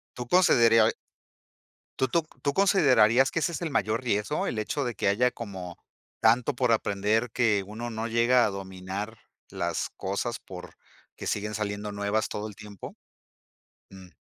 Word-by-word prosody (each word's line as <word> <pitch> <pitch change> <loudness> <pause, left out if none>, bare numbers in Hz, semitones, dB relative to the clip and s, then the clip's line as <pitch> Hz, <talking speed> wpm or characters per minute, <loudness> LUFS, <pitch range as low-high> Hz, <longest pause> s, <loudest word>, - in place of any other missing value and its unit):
¿Tú 125 -1 -6
consederiai 115 -10 +5 1.1
tú 130 - +2
tú 170 +7 +1
c 155 - -23
tú 140 - 0
considerarías 135 - +4
que - - 0
ese 165 +2 0
es 170 - -5
el 170 - -2
mayor 115 -2 0
riesgo, 115 +4 -1
el 110 - -2
hecho 140 +7 -2
de 120 -2 -3
que - - -1
haya 120 +6 +3
como, 95 -7 -8 0.4
tanto 120 +5 +3
por 125 -2 +1
aprender 110 +2 +1
que 110 -4 +2
uno 115 +3 -6
no 110 0 -4
llega 120 +2 +3
a - - +1
dominar, 95 +3 -6 0.3
las - - -2
cosas 100 +5 -3
por, 90 -1 -11 0.4
que - - -6
siguen 105 +1 -2
saliendo 105 -1 -3
nuevas 100 +1 -1
todo 105 +1 -4
el 105 - -10
tiempo? 105 -2 -10 1.0
Mm. 95 -1 -13
110 Hz, 165 wpm, -27 LUFS, 100-125 Hz, 1.1 s, consederiai